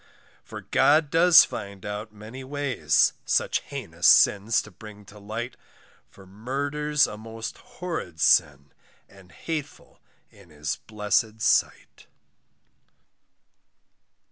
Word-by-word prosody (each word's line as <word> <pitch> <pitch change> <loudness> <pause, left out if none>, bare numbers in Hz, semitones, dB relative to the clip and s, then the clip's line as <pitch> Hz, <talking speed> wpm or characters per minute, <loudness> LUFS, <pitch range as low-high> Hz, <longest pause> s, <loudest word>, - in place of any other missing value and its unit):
For - - -9
God 150 0 +2
does 165 0 +7
find 100 -2 -8
out 105 +1 -6
many 110 +5 -11
ways, 140 -1 +1
Such - - 0
heinous - - -3
sins 105 +2 +4
to 105 - -14
bring 105 +2 -13
to 105 0 -15
light, 115 +4 -6 0.5
For 95 - -17
murder's 140 +8 -1
a 105 - -8
most 115 0 -8
horrid 180 - -7
sin, 70 -1 +2 0.4
And 95 -2 -19
hateful 150 - -7 0.3
in - - -19
his 75 0 -5
blessed 105 +1 -1
sight. - - 0
110 Hz, 110 wpm, -25 LUFS, 100-145 Hz, 0.5 s, does